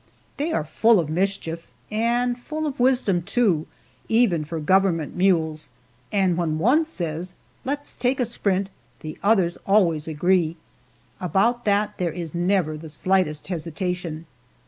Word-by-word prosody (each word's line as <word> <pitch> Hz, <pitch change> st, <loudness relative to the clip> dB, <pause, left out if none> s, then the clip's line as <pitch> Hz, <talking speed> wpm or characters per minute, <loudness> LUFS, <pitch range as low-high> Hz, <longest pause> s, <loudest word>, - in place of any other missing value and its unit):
They 305 Hz, +3 st, -1 dB
are 155 Hz, -, 0 dB
full 220 Hz, +7 st, +3 dB
of 155 Hz, -3 st, -2 dB
mischief, 170 Hz, -2 st, -2 dB, 0.2 s
and 240 Hz, +3 st, +1 dB
full 310 Hz, +6 st, -5 dB
of 290 Hz, -3 st, -4 dB
wisdom, 245 Hz, -8 st, +3 dB
too, 195 Hz, -4 st, +1 dB, 0.4 s
even 220 Hz, -9 st, +3 dB
for 160 Hz, +2 st, -5 dB
government 175 Hz, -1 st, +2 dB
mules, 160 Hz, -5 st, +1 dB, 0.4 s
and 190 Hz, -3 st, +2 dB
when 160 Hz, -3 st, 0 dB
one 255 Hz, -, +3 dB
says, 175 Hz, -, -3 dB, 0.3 s
"Let's 285 Hz, +2 st, -3 dB
take 255 Hz, +2 st, 0 dB
a 250 Hz, -, +2 dB
sprint," 200 Hz, -4 st, 0 dB, 0.3 s
the 155 Hz, 0 st, -7 dB
others 195 Hz, -5 st, +2 dB
always 170 Hz, -7 st, +2 dB
agree 170 Hz, +1 st, +1 dB, 0.6 s
about 215 Hz, +8 st, +1 dB
that 205 Hz, 0 st, +1 dB
there 175 Hz, -2 st, 0 dB
is 165 Hz, -1 st, -5 dB
never 175 Hz, -3 st, +1 dB
the 160 Hz, +1 st, -9 dB
slightest 155 Hz, -1 st, 0 dB
hesitation. 170 Hz, -1 st, -4 dB
185 Hz, 140 wpm, -23 LUFS, 165-225 Hz, 0.6 s, full